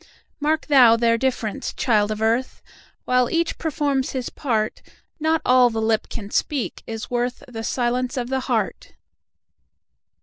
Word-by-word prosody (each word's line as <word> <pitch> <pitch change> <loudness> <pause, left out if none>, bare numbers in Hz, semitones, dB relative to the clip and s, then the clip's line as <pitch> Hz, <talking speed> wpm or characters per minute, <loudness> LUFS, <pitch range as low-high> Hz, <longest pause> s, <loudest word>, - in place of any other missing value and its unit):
Mark 305 +2 0
thou 255 -6 +6
their 230 0 +3
difference, 230 -4 -2
child 215 -4 +2
of 215 0 -3
earth! 230 +4 0 0.4
While 250 -1 +2
each 335 0 -1
performs 285 -4 -1
his 260 -2 -3
part, 220 -6 -2 0.4
Not 315 +1 +1
all 250 -1 +5
the 225 -1 -3
lip 220 0 0
can 205 -2 -7
speak 280 -6 -1
is 225 -1 -5
worthThe 245 -1 -3
silence 245 +2 -1
of 245 -1 -2
the 265 0 0
heart. 235 -6 -2
245 Hz, 140 wpm, -22 LUFS, 225-270 Hz, 0.4 s, thou